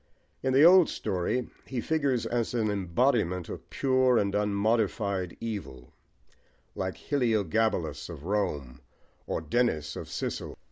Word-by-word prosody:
In 130 - 0
the 135 +3 +6
old 180 0 +8
story, 105 +5 -2 0.2
he 130 - -3
figures 140 -3 0
as 120 0 -1
an 110 -3 +1
embodiment 95 -2 +1
of - - -8
pure 130 -2 +3
and 100 -2 +1
unmodified 100 -2 0
evil, 100 - -6 0.8
like 95 -2 -3
"Hyliogabalus 110 - 0
of 80 -4 -8
Rome 75 -11 -2 0.5
or - - -2
Denis 80 -4 0
of - - -7
Sicyll." - - -4
105 Hz, 125 wpm, -28 LUFS, 90-125 Hz, 0.8 s, old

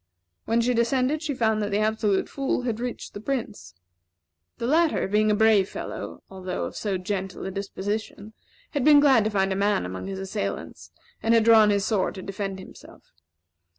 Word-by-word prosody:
When 230 +1 +2
she 245 +2 +1
descended 255 +5 +1
she 300 -4 -3
found 220 -2 +1
that 205 - -1
the 200 - 0
Absolute 215 -2 +1
Fool 270 -2 -2
had 235 -3 -2
reached 245 0 -5
the - - -7
Prince. 225 - -4 0.8
The 235 - -4
latter, 315 - +2
being 210 +2 +2
a 210 - +3
brave 210 -3 +4
fellow, - - -7
although 185 -1 -5
of - - -7
so 200 -3 -2
gentle 190 0 -4
a 190 - -4
disposition, 205 +2 -5 0.4
had 285 -4 -1
been 295 0 +7
glad 265 -7 +5
to - - +1
find 195 -2 +1
a - - -3
man 200 - +1
among 95 - -6
his 195 -1 -5
assailants, 100 - -5 0.3
and 225 +1 +3
had 225 - +4
drawn 220 -2 +6
his 200 -1 +1
sword 205 -5 0
to 190 - -7
defend 195 0 -4
himself. 190 - -14
210 Hz, 185 wpm, -25 LUFS, 195-235 Hz, 0.8 s, been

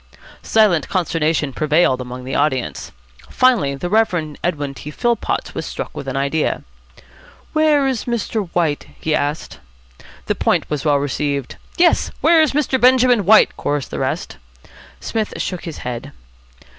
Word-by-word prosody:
Silent 200 -10 +2
consternation 165 -5 0
prevailed 155 -3 +2
among 125 0 -7
the 130 - -6
audience. 130 - -1 0.4
Finally 230 - +2
the 155 +6 -4
Rev. 175 -7 +1
Edwin 145 -5 -2
T. 145 - -9
Philpotts 235 +8 -1
was - - -4
struck - - -6
with 135 - -7
an 135 0 -3
idea. 140 +3 -1 0.9
"Where 310 -2 +3
is 260 -3 -2
Mr. 220 -4 -2
White?" 160 -4 0
he 160 - -1
asked. 150 +1 -2 0.7
The - - 0
point - - 0
was 150 -2 -2
well 150 -2 +3
received. 140 -1 -2 0.2
"Yes, 345 0 +3
where's 320 -3 +4
Mr. 275 -3 0
Benjamin 250 -4 +5
White?" 220 +1 +6
chorused 145 -3 -2
the - - -4
rest. - - -3 0.6
Psmith 220 -2 -3
shook 180 -2 -4
his 165 -3 -6
head. 120 -2 -5
160 Hz, 145 wpm, -19 LUFS, 145-225 Hz, 0.9 s, White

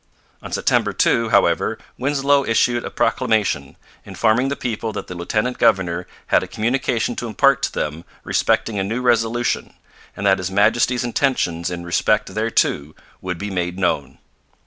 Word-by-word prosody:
On - - -9
September - - +1
2, 115 -1 +2
however, 100 -2 +2 0.2
Winslow 140 +1 +2
issued 120 0 +1
a - - -4
proclamation 110 - 0 0.3
informing 115 +4 +1
the 140 - -2
people 115 -3 -3
that - - -5
the - - -8
lieutenant 110 +8 -2
governor 90 -4 +2 0.2
had - - +4
a - - -6
communication 120 +1 -1
to 120 - -3
impart 140 +5 +3
to - - -1
them 75 +2 -3 0.2
respecting 105 -3 0
a - - 0
new 115 +6 -3
resolution, 120 0 0 0.4
and 100 - -4
that 95 -1 +4
His 90 0 -3
Majesty's 115 +5 +2
intentions 115 -9 0
in 85 -1 -5
respect 85 0 0
thereto 75 +2 0 0.3
would 90 -1 -4
be 100 +3 -5
made 90 -1 -2
known. 80 -7 -1
110 Hz, 155 wpm, -20 LUFS, 90-120 Hz, 0.4 s, had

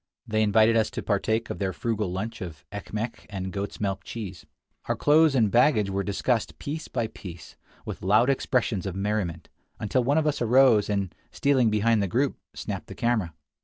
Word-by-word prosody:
They 110 0 0
invited 110 +2 +4
us 110 -1 +3
to - - -2
partake 110 +2 0
of - - -5
their 95 -2 -1
frugal 110 -4 -2
lunch 110 +5 -4
of 85 -4 -8
ekmek 105 +3 -5
and 95 -2 -5
goat's 100 0 -4
milk 100 -2 -2
cheese. 100 -7 -7 0.4
Our - - 0
clothes 150 0 +4
and 110 -6 +3
baggage 120 -5 +4
were 100 +1 0
discussed 105 +4 -1
piece 155 +2 -5
by 120 -3 -1
piece, 90 -6 -10 0.3
with - - -6
loud 105 +6 +4
expressions 125 -7 0
of 95 - -4
merriment, 95 -4 -2 0.3
until 110 +4 +1
one 140 +5 +2
of 160 - +2
us 150 -3 0
arose, 120 -3 +5
and, 100 -3 -1 0.2
stealing 130 -5 +3
behind 110 +1 +2
the 100 - 0
group, 130 +9 0 0.2
snapped - - -5
the - - -9
camera. 110 -9 0
110 Hz, 185 wpm, -26 LUFS, 100-120 Hz, 0.4 s, arose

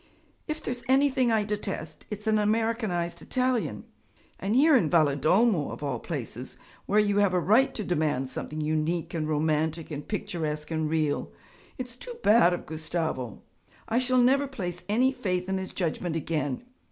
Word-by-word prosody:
'If 310 0 -4
there's 245 -1 -3
anything 265 -2 +3
I 220 -2 +3
detest, 200 -6 -4
it's 210 0 -6
an 215 -1 +3
Americanized 215 -5 0
Italian 255 -2 -1 0.6
and 200 +4 -1
here 300 +3 +6
in 175 -12 +3
Valedolmo 160 - +3
of - - -7
all 135 -5 -2
places, 125 -5 -6 0.3
where 205 - +2
you 205 -1 +2
have 200 -3 +3
a - - +4
right 220 +9 +4
to 215 - -2
demand 150 -7 0
something 155 +4 -5
unique 155 +2 -1
and 155 -2 -2
romantic 155 +1 0
and 145 -1 -6
picturesque 155 -7 -3
and 160 -1 0
real. 155 -2 0 0.5
It's 250 -2 -6
too 485 - -8
bad 210 -5 +6
of 175 - -3
Gustavo! 155 - -3 0.4
I 230 +2 +2
shall 255 0 +2
never 270 +3 +4
place 180 -9 -5
any 250 +5 +3
faith 185 -8 -2
in 190 0 -1
his 190 - -5
judgment 170 -1 -2
again. 155 - -2
180 Hz, 165 wpm, -27 LUFS, 155-230 Hz, 0.6 s, here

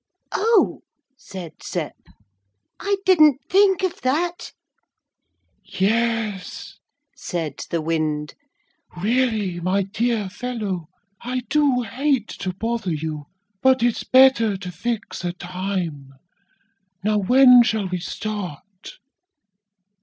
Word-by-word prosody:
'Oh,' 445 +1 +2 0.3
said 190 - -10
Sep, - - -4 0.8
'I 400 0 0
didn't 305 -7 +6
think 385 -1 +4
of 370 -2 -2
that.' 340 +7 -1 1.1
'Yes,' 220 -1 -2 0.4
said 160 -6 -4
the 165 -2 -1
wind, 155 -2 -1 0.7
'really, 215 -4 0
my 185 +3 +1
dear 220 +1 -1
fellow, 205 -5 -4 0.3
I 250 +1 -3
do 280 -5 +2
hate 260 +1 0
to 185 - -2
bother 220 -2 -2
you, 150 -1 -5 0.3
but 260 -2 +4
it's 240 -1 +1
better 255 -6 +5
to 185 -2 -7
fix 215 +3 -4
a 175 0 -2
time. 175 -6 -5 0.9
Now 210 0 +2
when 250 +4 +7
shall 220 -4 0
we 180 0 -3
start?' 200 -1 -7
215 Hz, 100 wpm, -22 LUFS, 180-255 Hz, 1.1 s, when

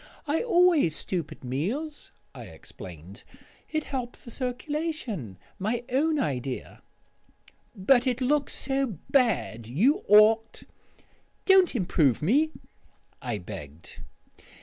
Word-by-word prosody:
"I 300 +2 0
always 350 - +4
stoop 170 0 -2
at - - -12
meals," 215 - -3 0.2
I - - -9
explained; 90 +4 -11 0.5
"it 310 -1 -1
helps 250 -3 -5
the 235 - -9
circulation. 250 - -4 0.2
My 225 +5 -1
own 305 +5 +1
idea." 130 - -3 0.9
"But 245 +7 +3
it 250 -1 0
looks 285 +2 +1
so 270 - -1
bad. 210 - +1
You 245 - +2
ought 220 +2 +5 0.4
" - - -38
"Don't 380 -6 +5
improve 160 - +2
me," 285 - +3 0.7
I 120 -4 -3
begged. 85 -5 -10
235 Hz, 110 wpm, -27 LUFS, -, 0.9 s, ought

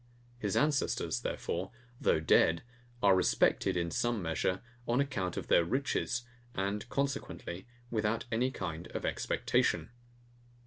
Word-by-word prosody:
His 105 -4 0
ancestors, 145 - +1
therefore, 90 +3 -2 0.3
though - - +3
dead, 80 +1 +4 0.4
are 100 -2 +7
respected, 90 -1 +3
in 85 -1 -1
some 120 +6 +1
measure, 90 +3 -1 0.2
on 120 +2 +2
account 100 -11 -1
of - - -3
their 85 - +5
riches; 125 +3 0 0.3
and 100 +4 -2
consequently, 135 -9 -3 0.2
without 110 +1 0
any 120 +3 +2
kind 90 -8 -5
of - - -2
expectation. - - +1
100 Hz, 125 wpm, -32 LUFS, 85-120 Hz, 0.4 s, are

